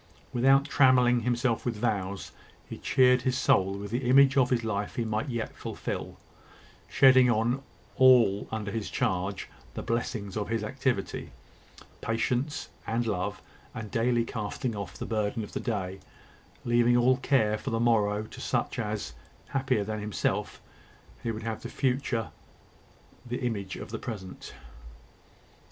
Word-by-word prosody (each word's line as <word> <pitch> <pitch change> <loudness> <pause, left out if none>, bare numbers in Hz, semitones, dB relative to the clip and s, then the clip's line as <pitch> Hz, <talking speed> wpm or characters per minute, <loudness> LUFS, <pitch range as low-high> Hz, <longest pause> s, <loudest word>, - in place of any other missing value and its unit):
Without 135 +3 +4
trammelling 125 -3 +5
himself 120 -1 0
with 120 -2 -2
vows, 100 -3 -2 0.4
he - - -8
cheered 125 -1 +4
his 130 +1 0
soul 95 -5 +2
with 100 0 -7
the 120 +1 -1
image 135 +1 +6
of 130 -2 +4
the 125 - +3
life 105 -2 -3
he 120 - -1
might 110 +5 -2
yet 120 -3 -3
fulfil, - - -5 0.7
shedding 130 -2 +6
on 120 +3 +1 0.4
all 125 -6 +5
under 105 -2 -3
his 110 0 -3
charge 95 +1 -1 0.3
the - - -4
blessings 115 -4 -2
of 105 -1 -2
his 115 -2 -1
activity, 130 -3 -2 0.7
patience, 130 +5 -1 0.2
and 115 +2 0
love; 95 -5 -2 0.3
and 110 -2 -6
daily 120 0 +2
casting 115 +2 -3
off 100 -3 -6
the - - -5
burden 110 +1 -1
of 105 - -10
the - - -2
day, 95 -4 -3 0.7
leaving 120 0 +4
all 125 +1 +4
care 130 -6 +2
for 120 - -5
the 115 -2 -1
morrow 105 -3 +2
to 110 - -10
such - - -1
as, - - -3 0.4
happier 130 -5 0
than 110 +1 -4
himself, 105 -1 -2 0.6
would 115 -2 -3
have 115 -1 -4
the - - -6
future 130 -4 -1 0.9
the 125 0 -4
image 100 -6 -3
of - - -8
the 110 - -4
present. 100 -7 -7
115 Hz, 145 wpm, -28 LUFS, 105-125 Hz, 0.9 s, image